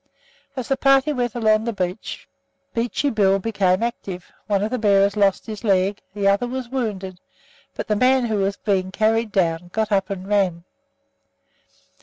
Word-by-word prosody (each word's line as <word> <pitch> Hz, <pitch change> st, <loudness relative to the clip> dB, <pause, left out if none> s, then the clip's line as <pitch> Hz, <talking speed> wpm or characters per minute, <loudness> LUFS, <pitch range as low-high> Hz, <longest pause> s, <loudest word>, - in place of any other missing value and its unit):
As 255 Hz, -3 st, -4 dB
the 270 Hz, -, +1 dB
party 275 Hz, +2 st, +3 dB
went 245 Hz, -4 st, -2 dB
along 220 Hz, -2 st, +2 dB
the 235 Hz, -, -2 dB
beach, 185 Hz, 0 st, -4 dB, 0.5 s
Beachy 245 Hz, +4 st, 0 dB
Bill 195 Hz, -3 st, +3 dB
became 195 Hz, -1 st, +1 dB
active; 190 Hz, -6 st, -5 dB, 0.2 s
one 200 Hz, -1 st, +1 dB
of 215 Hz, -, -2 dB
the 255 Hz, -, -1 dB
bearers 200 Hz, -1 st, +3 dB
lost 200 Hz, -2 st, +2 dB
his 215 Hz, -2 st, -7 dB
leg, 195 Hz, -1 st, +1 dB
the 200 Hz, -1 st, 0 dB
other 200 Hz, +5 st, +2 dB
was 255 Hz, -1 st, -5 dB
wounded, 200 Hz, -8 st, -4 dB, 0.6 s
but -, -, -5 dB
the 210 Hz, -, +1 dB
man 255 Hz, +3 st, +3 dB
who 220 Hz, -2 st, -1 dB
was 200 Hz, 0 st, 0 dB
being 190 Hz, -3 st, 0 dB
carried 220 Hz, +2 st, +1 dB
down 175 Hz, -2 st, 0 dB
got 220 Hz, +1 st, -1 dB
up 195 Hz, -2 st, +1 dB
and 190 Hz, -1 st, -5 dB
ran! 190 Hz, -5 st, +1 dB
205 Hz, 170 wpm, -22 LUFS, 195-235 Hz, 0.6 s, party